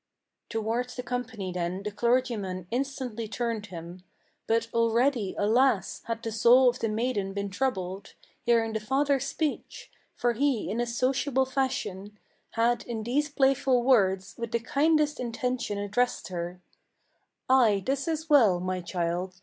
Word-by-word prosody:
Towards 225 +3 -2
the 250 - -5
company 245 -7 -4
then 180 +2 -3
the 210 - -3
clergyman 215 -5 0
instantly 250 -3 -3
turned 225 -1 -3
him; 175 0 -9 0.4
But 230 0 +1
already, 230 -2 +2
alas! 215 -1 +2
had 230 0 -4
the 225 - -3
soul 240 +4 +6
of 245 - -4
the 225 - -1
maiden 215 -3 -1
been 200 0 -3
troubled, 195 -5 -3 0.3
Hearing 230 -2 +2
the 220 - -1
father's 270 +4 +1
speech; 310 -3 -4 0.2
for 240 -1 +1
he, 255 -5 0
in 225 - -2
his 240 0 -2
sociable 265 +1 +1
fashion, 210 -7 -3 0.4
Had 235 +1 +2
in 225 -2 -4
these 285 +6 0
playful 270 -2 +2
words, 195 -7 +3
with 235 -1 -4
the 235 - +2
kindest 300 +4 +1
intention 245 -2 -2
addressed 205 +4 -1
her: 175 0 -5 0.9
"Ay, 230 -7 +4
this 275 +3 -1
is 320 0 -2
well, 230 - +5
my 185 0 -2
child! 175 +1 -2
230 Hz, 145 wpm, -28 LUFS, 200-255 Hz, 0.9 s, soul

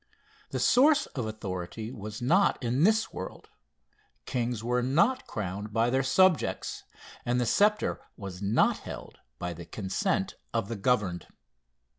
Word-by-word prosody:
The - - -3
source 295 +4 +5
of 125 -5 -3
authority 110 +1 -5
was 110 -1 -7
not 190 +10 +4
in 125 +7 +2
this 220 +1 +2
world; 95 - -7 0.8
kings 120 -3 -2
were 125 +1 +1
not 170 - +2
crowned 105 +1 -4
by 115 +2 +2
their 130 +1 +3
subjects, 160 +5 +2 0.4
and 120 +1 +1
the 125 - +1
sceptre 210 - +2 0.2
was 95 -2 -7
not 100 +2 +3
held - - -9 0.2
by 90 +4 -4
the 85 +1 -9
consent 95 +1 -1 0.2
of 100 - 0
the 115 - -2
governed. 100 -6 0
120 Hz, 140 wpm, -29 LUFS, 100-135 Hz, 0.8 s, source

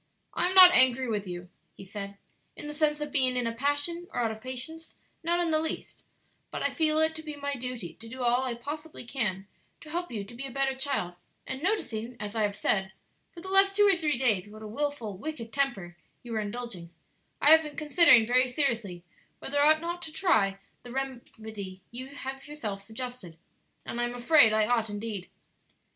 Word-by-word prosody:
"I - - +1
am 370 - -1
not 365 -1 +11
angry 255 -1 +4
with 210 -3 -2
you," 175 0 -7 0.3
he 195 - -11
said, 200 0 -7 0.4
"in - - -7
the 295 - -5
sense 300 0 +1
of 295 -1 -4
being 260 -3 +2
in 245 - 0
a 230 - -1
passion 290 +7 -1
or - - -2
out 225 -2 0
of 220 0 -9
patience 260 +6 -6 0.3
not 340 +1 0
in 340 -2 +1
the 310 - +3
least; 320 0 -5 0.4
but - - -4
I - - +1
feel 310 -2 +2
it 315 0 +2
to 315 - -8
be 305 -1 -7
my 285 0 -3
duty 250 -8 -6
to 225 - -12
do 255 +2 -6
all 245 +1 +3
I 250 -2 -2
possibly 300 +3 -7
can 210 -7 -2 0.3
to 305 - -12
help 350 +1 -3
you 215 -4 -4
to 200 - -12
be 265 +3 -5
a - - -8
better 270 +1 0
child, 265 -10 -1 0.3
and 265 +1 -5
noticing, 245 - -2
as 210 +1 -5
I 220 - +1
have 205 -1 0
said, 190 -2 0 0.4
for 340 - -11
the 375 - -8
last 390 0 +6
two 415 0 +5
or 390 - +5
three 305 -6 0
days 215 -7 +1
what 215 +1 -11
a - - -6
wilful, 235 -4 -3
wicked 235 -5 -6
temper 225 -12 -1 0.3
you 240 - -9
were 220 - -1
indulging, 210 -5 -5 0.5
I 295 - +7
have 320 0 +9
been 300 -2 -8
considering 305 -6 +6
very 255 +2 +3
seriously 235 - -1 0.3
whether 285 +1 -3
I 295 +2 +7
ought 315 0 +2
not 345 +1 -4
to 320 - -7
try 220 - +2 0.2
the 245 - -11
very 265 -1 -3 0.2
remedy 200 -4 -8
you 255 +2 -7
have 270 0 -7
yourself 220 -10 -5
suggested, 220 -5 -7 0.5
and 240 - -3
I - - +1
am 240 0 -5
afraid 245 -1 +6
I 215 0 +3
ought 225 -1 +1
indeed. 205 -2 -5
255 Hz, 215 wpm, -28 LUFS, 220-300 Hz, 0.5 s, not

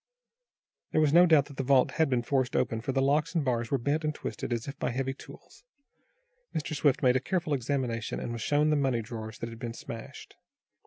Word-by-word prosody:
There - - +3
was 150 -2 +3
no 175 +2 +7
doubt 155 -4 +5
that 140 -2 -13
the 135 - -1
vault 130 -1 +4
had 160 -1 +1
been 125 -2 +1
forced 130 0 0
open, 115 0 0
for 135 - -2
the 135 0 +1
locks 150 +5 +1
and 160 -4 +1
bars 120 -2 0
were 140 - +2
bent 145 +6 -1
and 155 -1 -1
twisted - - -5
as 120 +1 -2
if 140 - -5
by - - 0
heavy 135 +2 -2
tools. 135 - -15 0.9
Mr. 155 0 -2
Swift 145 -2 +2
made 125 -1 +5
a - - 0
careful 160 0 -1
examination, 125 -3 -2
and 120 - -4
was 115 - -5
shown 150 +1 +2
the - - +3
money 135 -5 +1
drawers 110 -1 -7
that 115 - -5
had 115 0 -10
been 115 -1 -5
smashed. 115 -1 -9
135 Hz, 225 wpm, -29 LUFS, 120-150 Hz, 0.9 s, no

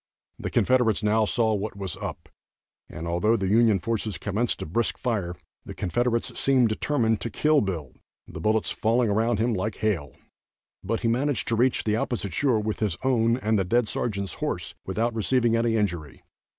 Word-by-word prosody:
The - - -3
Confederates 125 -4 +2
now 110 +1 +3
saw 110 0 +1
what 105 0 -3
was 95 -4 -4
up, - - -7 0.6
and 80 +2 -6
although 90 +7 +2
the 95 -2 -1
Union 110 0 +4
forces 110 0 -2
commenced 110 +4 -1
a - - -4
brisk 110 +9 -1
fire, 100 -8 -2 0.3
the - - -9
Confederates 120 +5 -1
seemed 130 -4 +3
determined 110 -1 0
to 115 - -3
kill 150 +7 +3
Bill, 85 -9 -4 0.3
the - - -8
bullets 110 0 +1
falling 115 0 +1
around 110 +2 +1
him 115 +3 +1
like 105 +2 -2
hail; 90 - -2 0.7
but 115 - -2
he 115 - 0
managed 130 +4 0
to 115 - +2
reach 125 +3 +2
the 105 0 +1
opposite 110 -5 -2
shore 130 -6 +2
with 105 0 -3
his 100 -7 0
own 120 -3 +2
and 110 -4 +1
the - - +2
dead 115 +5 +1
sergeant's 100 -5 -2
horse - - -2
without 115 +5 0
receiving 115 +1 +2
any 115 0 +1
injury. 85 -9 -2
110 Hz, 180 wpm, -26 LUFS, 100-120 Hz, 0.7 s, Union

